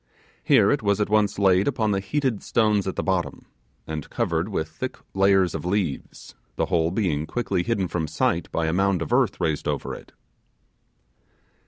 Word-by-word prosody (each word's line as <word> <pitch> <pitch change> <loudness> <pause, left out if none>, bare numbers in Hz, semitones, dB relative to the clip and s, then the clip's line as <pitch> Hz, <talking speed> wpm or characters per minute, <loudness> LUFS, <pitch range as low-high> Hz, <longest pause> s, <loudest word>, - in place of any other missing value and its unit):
Here - - +5
it - - +1
was 100 0 +1
at 105 0 -1
once 105 -1 +2
laid 95 -1 +3
upon 110 -6 +1
the 100 - +1
heated 130 +2 -1
stones 105 -4 +1
at 95 - -3
the - - -2
bottom, 95 -3 -2 0.4
and 80 -2 -6
covered 85 +4 -1
with 80 -6 -2
thick 125 +12 -6 0.2
layers 95 -2 +3
of 80 - -4
leaves, 90 -5 -3 0.2
the - - 0
whole 85 -3 +1
being 85 -6 -1
quickly 100 -7 -1
hidden 100 -2 -1
from 80 -2 -2
sight 85 +2 -1
by 85 - 0
a 80 - 0
mound 95 -2 +1
of 75 - -4
earth - - +2
raised 75 -2 -1
over - - -2
it. - - -11
95 Hz, 180 wpm, -24 LUFS, 85-105 Hz, 0.4 s, Here